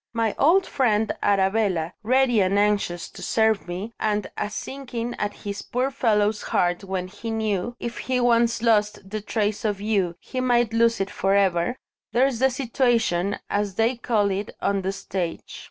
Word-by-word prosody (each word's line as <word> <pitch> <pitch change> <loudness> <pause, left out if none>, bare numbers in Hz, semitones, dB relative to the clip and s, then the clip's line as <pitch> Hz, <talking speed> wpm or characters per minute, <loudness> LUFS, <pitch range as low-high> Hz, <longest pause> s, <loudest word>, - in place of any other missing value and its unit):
My 225 -2 0
old 365 +6 +5
friend 220 -5 +1
Arabella, 195 -4 +1
ready 245 0 +3
and 190 +1 +2
anxious 205 -4 +1
to - - -12
serve 220 -3 +1
me 190 +6 -5
and 210 -1 0
a 210 - -2
sinking 240 0 -5
at 205 0 -4
this 200 -1 -4
poor 255 +3 -1
fellow's 210 -4 +1
heart 175 +1 0
when 190 -1 -3
he 205 +4 -7
knew, 220 0 -1
if 235 -1 -5
he 255 -1 -1
once 235 -1 +2
lost 210 -4 +2
the 215 0 -3
trace 210 0 -1
of 205 -3 -1
you, 200 -5 0
he 255 - -4
might 240 -3 +2
lose 230 0 +3
it 195 - -2
for 195 +1 +1
ever 190 +2 +2 0.4
there's 250 0 +2
the 265 +1 +4
situation, 235 -7 +1
as 205 -2 -1
they 225 +4 +2
call 215 -4 +1
it 200 +2 -3
on 200 -1 0
the 190 +1 -1
stage. 185 -3 -5
215 Hz, 170 wpm, -24 LUFS, 195-235 Hz, 0.4 s, old